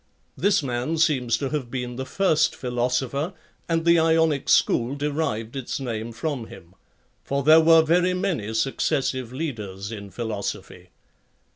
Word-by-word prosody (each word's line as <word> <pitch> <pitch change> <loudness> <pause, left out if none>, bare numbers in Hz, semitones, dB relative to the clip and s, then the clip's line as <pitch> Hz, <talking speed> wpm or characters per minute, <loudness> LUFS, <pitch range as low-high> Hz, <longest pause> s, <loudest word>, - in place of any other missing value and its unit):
[This 200 -6 +2
man 125 +5 -2
seems 130 -8 +2
to 135 - -3
have 145 -5 -3
been 125 -1 -4
the 130 +1 -5
first 175 0 +2
philo 125 -1 -1
sopher, 140 +7 -2 0.4
and 165 0 0
the 170 0 +5
Ionic 160 -3 +2
school 120 +4 +3
derived 140 -6 -2
its 135 0 -4
name 115 -3 -4
from 120 +1 -4
him; 85 +2 -14 0.5
for 140 0 -2
there 155 +3 +7
were 165 0 +6
very 180 +3 +2
many 160 - -2
successive 130 0 -1
leaders 105 -9 -5
in 100 -2 -7
philosophy. 110 -2 -5
135 Hz, 145 wpm, -24 LUFS, 120-160 Hz, 0.5 s, there